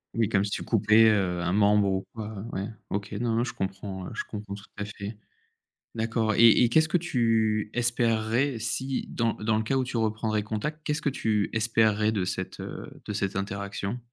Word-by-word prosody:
Oui, 115 -2 +2
comme 100 -2 +2
si 100 - -2
tu - - -3
coupais, 110 0 +5
heu, 95 -5 +1
un 85 +1 0
membre 105 0 +4
ou 95 0 -1
quoi. 110 -1 -5 0.2
Ouais. 95 +1 -3 0.2
OK. 100 +1 -3
Non, 115 +2 -1
non, 115 - +2
je 125 - -4
comprends, 95 -1 -5
heu, - - -8
je - - -2
comprends 105 -2 -7
tout 100 - -11
à 105 - -2
fait. 105 +1 -7 0.8
D'accord 115 -1 0
et 115 0 +8
et 120 - +4
qu'est-ce 160 +6 +4
que 180 - +2
tu 115 -9 +1
espérerais, 120 +2 +1
si, 130 +4 -1
dans 115 -2 0
dans 110 0 0
le 110 - 0
cas 120 +5 0
où 130 - +2
tu 125 -1 -3
reprendrais 110 -1 0
contact, 130 +9 -4
qu'est-ce 150 +1 -1
que - - +1
tu 110 -6 0
espérerais 110 -1 +2
de 100 -4 0
cette, 95 0 -4
heu, - - -7
de 105 - -4
cette 100 -2 -2
interaction? 100 +3 -3
110 Hz, 205 wpm, -27 LUFS, 100-115 Hz, 0.8 s, et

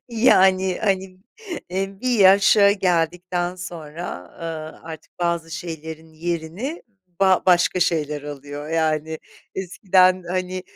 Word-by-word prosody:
Yani 190 -6 +3
hani, 190 -2 -1 0.5
e, 195 +1 -3
bir 250 -3 0
yaşa 200 +1 +6
geldikten 180 -1 -1
sonra, 165 - -7
eee, 160 -1 -6
artık 160 +2 -11
bazı 170 -1 -1
şeylerin 160 -1 -7
yerini 170 - -4 0.4
ba 190 -1 +4
başka 180 0 +3
şeyler 150 -4 0
alıyor 145 +1 -8
yani 160 -1 -1 0.4
eskiden, 185 0 +2
hani, 185 0 -3
175 Hz, 105 wpm, -22 LUFS, 160-190 Hz, 0.5 s, yaşa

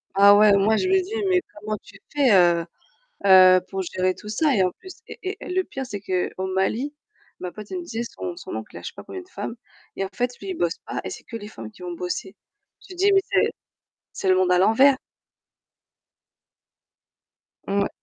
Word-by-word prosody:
Ah 200 +1 +8
ouais, 210 -1 +6
moi 205 +3 +3
je 370 - 0
me 380 0 +4
dis, 380 +4 -8 0.2
mais 365 -1 +3
comment 210 +1 -4
tu 200 0 -16 0.2
fais 280 -4 +3
heu 175 -3 +4 0.6
heu, 185 -1 +8
pour 195 0 -3
gérer 185 0 0
tout 210 - -10
ça? 275 +5 +2
Et 190 - +3
en 180 - +1
plus 375 -1 -10
et - - -9
et 380 +1 -3
et - - -8
le 370 +1 +1
pire 270 -5 -6
c'est 205 -5 -6
qu'au 185 0 -2
Mali, 230 +9 0 0.5
ma 180 - -5
pote, 210 +1 -11
elle 365 - -3
me - - -6
disait 235 -8 -4
son 360 -1 -4
son 355 - -8
oncle - - -7
il - - -6
a - - -9
je - - -7
sais - - -7
pas - - -10
combien 375 - -7
de 360 - -18
femmes 230 - -5 0.4
et 195 - -2
en - - -7
fait 245 +3 -1
lui 390 - -7
il 375 - -1
bosse 405 - 0
pas - - -4
et - - -5
c'est - - -9
que 230 - -10
les 205 -2 -9
femmes 115 - -9
qui - - -18
vont 175 -1 -5
bosser. 180 +3 -5 0.5
Tu 375 - -12
te - - -16
dis 400 +2 +4
mais 390 - +5
c'est - - +3 0.6
c'est 190 - -3
le 185 - +5
monde 185 -1 +2
à 180 - +4
l'envers. 260 +8 +5 2.7
Mouais. 200 0 0
210 Hz, 230 wpm, -24 LUFS, 190-300 Hz, 2.7 s, Ah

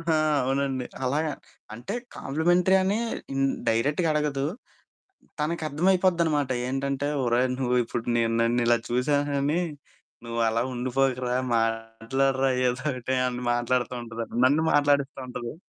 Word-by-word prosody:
ఆ! 165 -1 0 0.3
అవునండి. 135 -1 -1 0.2
అలాగా 150 +4 0 0.4
అంటే 155 - -6 0.2
కాంప్లిమెంటరీ 175 +6 +2
అని 200 +4 +1 0.4
హ్మ్, 135 0 +2 0.2
డైరెక్ట్‌గా 145 +9 +1
అడగదు. 150 -2 0 1.0
తనకి 160 +2 -1
అర్థమైపోద్ది 180 +3 +2
అనమాట. 145 -4 0 0.2
ఏంటంటే 135 +1 -2 0.2
"ఒరేయ్ 120 +2 +2
నువ్వు 125 -1 +1
ఇప్పుడు 115 0 -4
నేను 115 -1 +1
నన్ను 120 +1 +2
ఇలా 120 0 +4
చూసాను 145 +4 +1
అని 150 +5 +1 0.6
నువ్వు 115 0 -3
అలా 115 +1 +1
ఉండిపోకురా, 125 0 0 0.2
మాట్లాడరా 115 +4 0 0.2
ఏదో 125 +1 -1
ఒకటి" 125 +1 -3
అని 125 0 -5
మాట్లాడుతుంటదండి. 120 -2 -2
నన్ను 150 +4 +3
మాట్లాడిస్తుంటది. 135 -4 0
135 Hz, 120 wpm, -26 LUFS, 120-145 Hz, 1.0 s, ఇలా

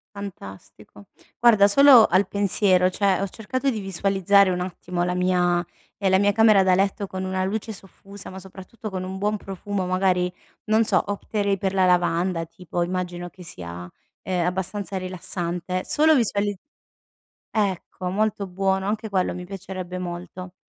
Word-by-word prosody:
Fantastico. 100 - -10 0.3
Guarda, 215 -4 +6
solo 255 +1 +8
al 185 +2 +2
pensiero 190 -2 +2
cioè 195 0 +1
ho 200 - -1
cercato 255 +7 -3
di 225 -5 -2
visualizzare 195 0 +2
un 180 -1 -1
attimo 180 -1 -4
la 180 0 -1
mia 180 -1 +1 0.3
ehm, 195 -2 0
la 190 - +4
mia 205 +1 +3
camera 215 -2 +5
da 185 -1 +3
letto 195 +2 +1
con 190 -1 -6
una 185 0 -1
luce 220 +3 -3
soffusa, 195 0 -12
ma 190 - -8
soprattutto 190 +4 -9
con 185 -2 -4
un 190 +1 -5
buon 210 +1 0
profumo, 195 0 -4
magari, 180 -1 +1 0.3
non 220 +1 +3
so - - +2
opterei 205 0 -1
per 190 0 -1
la 190 -1 +4
lavanda 175 -1 +1
tipo. 175 +1 -5
Immagino 175 0 -3
che 180 - -14
sia, 90 - -8 0.3
ehm, 180 -2 -1
abbastanza 190 +1 -3
rilassante. 185 0 -4
Solo 310 +1 +4
visuali 205 -5 0 0.9
ecco, 190 -3 -2
molto 205 +1 -1
buono, 190 +1 -1
anche 220 +1 -3
quello 190 -2 0
mi 180 - -7
piacerebbe 185 -1 -7
molto. 180 +1 -7
190 Hz, 155 wpm, -23 LUFS, 180-200 Hz, 0.9 s, solo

